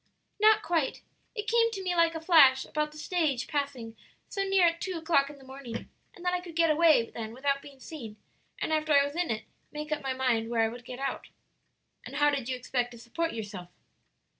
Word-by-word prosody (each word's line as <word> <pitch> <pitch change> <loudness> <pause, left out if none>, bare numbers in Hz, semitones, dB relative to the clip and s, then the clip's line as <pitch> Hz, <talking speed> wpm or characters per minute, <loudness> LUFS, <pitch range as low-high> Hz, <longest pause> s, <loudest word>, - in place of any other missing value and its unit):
"Not 430 0 +5
quite. 320 -4 -1 0.3
It 425 -1 -4
came 460 0 +4
to 390 - -4
me 360 -1 -1
like 335 -1 +3
a - - -2
flash 315 -6 +6
about 300 0 -2
the 305 - -13
stage 305 -6 0
passing 275 -6 -3 0.3
so 395 - -2
near 390 -2 +4
at 335 0 +1
two 370 -2 -3
o'clock 315 -4 +2
in 295 - -11
the 270 - -16
morning, 260 -3 -8 0.2
and 350 - -12
that 360 - +2
I 360 - 0
could 345 -3 -11
get 330 -1 +4
away 310 -7 +4
then 225 -1 -6
without 275 +1 0
being 280 -2 -14
seen, 240 -8 -9 0.4
and 315 - -2
after 310 0 +1
I 280 0 +6
was 285 +1 -6
in 350 0 0
it 220 -1 -2 0.3
make 300 0 -6
up 300 -1 -1
my 270 -1 -2
mind 245 -4 0
where 230 -1 +2
I 225 - +2
would 240 +1 -10
get 245 - -7
out." 275 +1 -3 0.8
"And - - -9
how 295 0 +4
did 270 -4 -3
you 260 - 0
expect 250 0 -2
to - - -11
support 285 +9 -3
yourself?" 205 -5 -6
290 Hz, 225 wpm, -29 LUFS, 250-335 Hz, 0.8 s, flash